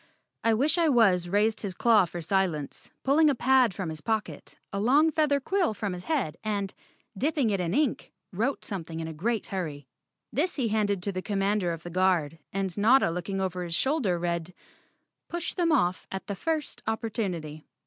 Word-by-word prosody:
I 225 -1 +3
wish 290 +9 +2
I 330 -2 +4
was 195 -9 +4
raised 210 +3 +2
his 195 -4 -4
claw 220 -3 +5
for 175 0 -6
silence, 170 -5 -1
pulled 300 +3 +5
a 280 - +2
pad 255 -2 +4
from 180 -2 -4
his 155 -1 -6
pocket, 220 +2 -3 0.2
a 200 - -1
long 285 +9 +4
feather 300 -2 +2
quill 350 - 0
from 205 -3 -3
his 180 0 -7
head 275 - -1
and, 200 -3 -2 0.4
dipping 275 0 +1
it 200 - 0
in 175 0 -1
ink, 290 -5 0 0.2
wrote 235 +9 -1
something 165 -5 -5
in 160 - -4
a 160 - -6
great 220 +8 -1
hurry. 155 -8 -4 0.5
This 340 +7 0
he 250 -6 0
handed 205 -3 0
to 200 - -1
the 185 -1 -4
Commander 195 -2 0
of 165 -1 -6
the 175 - -7
Guard 175 -4 +1
and 195 -2 -2
Notta 220 -1 +4
looking 180 +3 -3
over 185 -1 -2
his 170 -1 -2
shoulder 265 - +1
read, 170 0 -3 0.7
"Push 345 0 -3
them 345 -3 +1
off 180 - +1
at 190 - -5
the 200 - -4
first 315 - -3
opportunity." 185 -9 -3
200 Hz, 190 wpm, -28 LUFS, 175-255 Hz, 0.7 s, claw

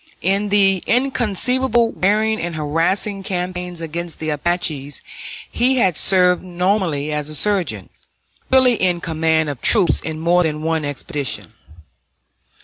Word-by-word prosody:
In 195 +3 +1
the 195 -2 +3
inconceivably 245 -1 +1
wearing 215 +3 +1
and 170 -1 -4
harassing 165 +7 0
campaigns 180 -2 -4
against 165 +1 -5
the 155 -1 -3
Apaches 150 -2 -1 0.5
he 255 +2 +1
had 190 -9 +2
served 180 0 +3
nominally 180 -5 -1
as 150 0 -3
a 155 - -7
surgeon, 155 - 0 0.6
really 260 -3 +4
in 180 -2 +1
command 160 -2 0
of 140 -4 -5
troops, 205 -6 +4
on 160 -1 -4
more 175 +2 +3
than 155 -2 -2
one 160 -1 -1
expedition. 145 -1 -4
180 Hz, 130 wpm, -19 LUFS, 155-200 Hz, 0.6 s, really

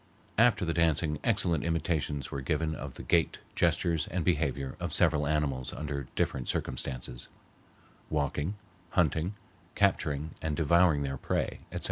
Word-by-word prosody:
After 115 -5 +5
the 80 - 0
dancing 80 -2 +2
excellent 95 -8 +2
imitations 80 -4 -1
were 70 - -3
given 80 +3 0
of - - -6
the - - -7
gait, 85 -2 +2 0.2
gestures, 80 -2 +2
and 90 -1 -2
behavior 70 -6 0
of - - -2
several 75 -3 +3
animals 70 -4 0
under 70 -3 -4
different 65 -2 0
circumstances—walking, 70 - -4 0.3
hunting, 85 +3 +1 0.4
capturing, 80 -6 +1
and 80 -2 -1
devouring 85 -2 +4
their 70 -1 -3
prey, - - -1
etc. - - -3
75 Hz, 130 wpm, -30 LUFS, 70-85 Hz, 0.4 s, After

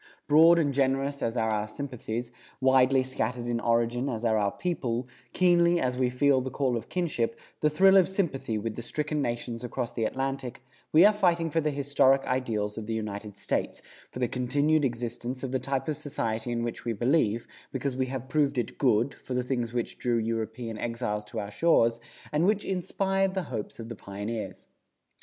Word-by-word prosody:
Broad 160 +3 +7
and 145 -4 +2
generous 135 +1 0
as 115 +1 -1
are 110 -1 +1
our 105 0 -1
sympathies, 120 -1 -5 0.3
widely 130 0 +4
scattered 125 -2 -3
in 120 -1 -1
origin 120 +3 +1
as 115 -1 -3
are 110 -1 +3
our 100 -2 +1
people, 125 -9 -2 0.2
keenly 175 -1 +4
as 125 -3 0
we 125 -1 +1
feel 130 +1 +3
the 130 - -4
call 130 -2 0
of 115 -1 -5
kinship, 150 -11 -1 0.2
the 150 - +3
thrill 190 +6 +5
of 185 - +5
sympathy 155 - -1
with 110 +1 -3
the - - -5
stricken 150 +5 -2
nations 120 -1 -3
across 120 0 -3
the 115 -2 -1
Atlantic, 135 0 -3 0.3
we 165 +5 +7
are 210 - +7
fighting 170 -5 +2
for 165 - +2
the 150 - +1
historic 140 -1 +3
ideals 115 -5 -1
of 105 - -7
the 115 - -1
United 105 -1 -5
States, - - -2 0.3
for - - -9
the 125 -1 +1
continued 145 +6 +1
existence 120 +1 -3
of 130 - -3
the 130 - 0
type 135 +2 -2
of 155 - 0
society 120 -5 -3
in 115 0 -1
which 120 -1 -4
we 120 - -1
believe, 120 -1 +1 0.3
because 135 0 -2
we 130 0 0
have 130 0 -5
proved 145 -1 +1
it 120 - -3
good, 125 0 +3
for 130 - -7
the 125 - +1
things 120 -2 -2
which 120 -1 -3
drew 120 -1 +1
European 115 0 -3
exiles 115 -3 -2
to 105 +2 -6
our 100 0 -5
shores, 115 -4 +3 0.3
and 155 +4 +2
which 210 0 +1
inspired 195 +1 0
the 190 - 0
hopes 105 - -4
of 115 - -6
the 115 - -6
pioneers. 105 +3 -6
125 Hz, 195 wpm, -28 LUFS, 115-145 Hz, 0.3 s, Broad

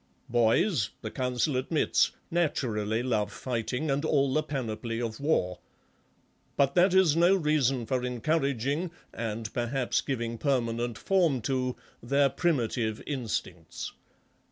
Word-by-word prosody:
Boys, 120 - +3
the 110 - -4
Council 125 +3 0
admits, 145 +5 +2 0.2
naturally 120 -10 0
love 105 -5 0
fighting 125 +5 -2
and 140 +2 0
all 140 -4 +2
the 155 - +3
panoply 115 -6 -3
of 115 -2 -3
war... 90 - 0 1.0
but 140 -1 +3
that 180 +1 +4
is 180 -5 +5
no 175 +3 +5
reason 145 -7 +1
for 125 +2 -1
encouraging, 140 +4 0 0.2
and 110 -1 -4
perhaps 125 +1 0
giving 115 -3 -3
permanent 120 -4 0
form 175 -9 +2
to, 125 +1 -1 0.3
their 140 +3 +3
primitive 120 -9 0
instincts. 105 - -4
130 Hz, 120 wpm, -28 LUFS, 115-150 Hz, 1.0 s, is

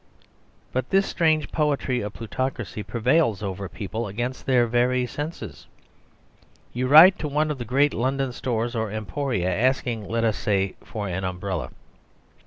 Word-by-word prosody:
But 130 0 -2
this 195 0 +3
strange 155 -3 +1
poetry 145 -5 0
of 105 0 -5
plutocracy 120 -1 -4
prevails 115 - +1
over 95 -1 -4
people 110 +2 -4
against 120 +6 -4
their 125 -3 +4
very 125 +2 +1
senses. 145 +6 -7 1.1
You 125 +1 -1
write 160 +7 +8
to 155 - -2
one 150 +1 0
of 145 - -5
the 120 - -4
great 140 +3 +3
London 135 +2 -1
stores 120 -1 -2
or 110 -1 -1
emporia, 110 -3 -2
asking, 120 -1 0
let 115 0 0
us 110 -2 +1
say, 95 -2 0
for 105 -2 -5
an 95 +1 -3
umbrella. 90 +1 -3
120 Hz, 150 wpm, -24 LUFS, 105-135 Hz, 1.1 s, write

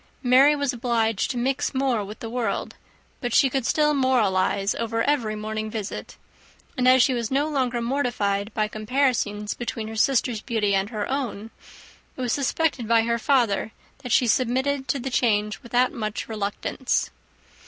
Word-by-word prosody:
Mary 265 +4 +6
was 285 -2 -1
obliged 230 -3 0
to 250 - -3
mix 265 +3 -1
more 260 -5 +1
with 210 +2 -9
the 225 - -5
world, 240 -2 -2 0.5
but 245 -2 -2
she 270 -3 +5
could 265 -3 -1
still 300 -1 +3
moralize 205 -7 +2
over 230 0 -2
every 240 -7 0
morning 215 0 -4
visit; 215 -2 -6 0.6
and 250 0 +1
as 255 -1 +7
she 260 - +2
was 235 -3 -2
no 280 +3 +1
longer 255 -5 -1
mortified 235 -6 -1
by 215 -1 +1
comparisons 215 -2 -1
between 230 -2 -5
her 220 - -7
sisters' 235 -1 +1
beauty 215 -4 0
and 195 +1 +1
her 215 -3 -3
own, 235 -5 -3 0.7
it - - -5
was 245 -2 0
suspected 280 -3 0
by 230 0 +4
her 235 0 0
father 230 -5 +1 0.3
that 250 -3 -7
she 250 - +4
submitted 260 +4 +1
to - - 0
the 265 +1 -5
change 210 -4 +1
without 245 +1 +1
much 215 0 -4
reluctance. 215 +4 -2
235 Hz, 165 wpm, -24 LUFS, 215-260 Hz, 0.7 s, as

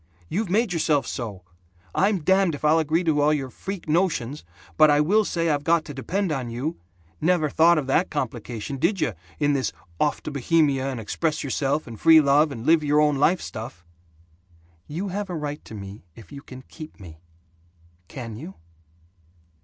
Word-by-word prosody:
You've 205 +2 -2
made 210 +1 +1
yourself 155 -3 +1
so. 105 -7 -5 0.5
I'm 195 -4 +1
damned 190 -2 +3
if 145 - -5
I'll 155 +2 +5
agree 160 +3 +1
to 155 -3 +2
all 150 +1 +4
your 135 -4 -2
freak 190 +3 -7
notions, 150 -5 0 0.3
but 155 -1 +6
I 145 0 +4
will 200 +9 +3
say 170 -4 -1
I've 145 -1 -1
got 165 0 +2
to 145 - -7
depend 180 +7 -2
on 130 -5 -2
you. 130 +8 -4 0.4
Never 160 -2 +2
thought 170 +1 +5
of 150 - -1
that 135 +7 +1
complication, 125 -3 -4
did 195 +8 +1
you, 115 - 0 0.2
in 145 0 +2
this 135 -2 0 0.3
'off 150 - 0
to - - -5
Bohemia, 140 -1 +1
and 130 -3 -4
express 155 +8 -2
yourself, 140 +2 -1
and 115 -3 -10
free 160 0 +8
love, 145 +1 +4
and 120 -3 -7
live 160 0 +4
your 150 0 +3
own 150 -2 +3
life' 170 +6 +3
stuff!" 110 -6 -8 1.0
"You 180 +7 -4
have 200 +1 -4
a 180 - -3
right 150 -1 -5
to 110 - -9
me 100 -1 -9
if 115 - -14
you 140 -1 -9
can 130 -1 -12
keep 155 +1 -12
me. 80 -5 -12 0.9
Can 115 -1 -7
you?" 160 - -9
150 Hz, 185 wpm, -24 LUFS, 135-165 Hz, 1.0 s, free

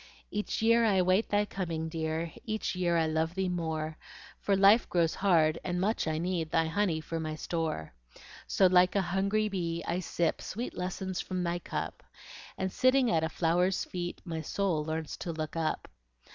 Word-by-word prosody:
Each 210 +1 -2
year 230 +1 +5
I 195 -5 +4
wait 185 +4 +2
thy 205 0 +2
coming, 165 -5 -3
dear, 160 0 -3
Each 215 -3 -2
year 175 -2 +1
I 165 - +3
love 160 +2 0
thee 190 -1 0
more, 160 -3 -3 0.4
For 200 - +1
life 200 +4 +5
grows 170 -2 +2
hard, 165 -5 +3
and 180 -1 -2
much 205 -1 0
I 155 0 0
need 170 -1 -1
Thy 165 0 +2
honey 160 -1 0
for 165 +1 -4
my 155 -1 -3
store. 155 - -3 0.5
So, 190 - +3
like 180 0 +5
a 200 - +4
hungry 195 +4 +1
bee, 170 -4 -2
I 175 - 0
sip 170 -2 -1
Sweet 235 +5 -5
lessons 185 0 -3
from 185 -1 -3
thy 175 0 -1
cup, - - -4 0.6
And 190 0 -1
sitting 255 +1 +3
at 160 -1 +2
a 160 - 0
flower's 180 +3 +1
feet, 175 -1 -5
My 165 -3 -3
soul 170 -1 0
learns 160 0 -3
to 170 - -4
look 155 -1 -4
up. 160 -1 -1
175 Hz, 185 wpm, -30 LUFS, 160-190 Hz, 0.6 s, year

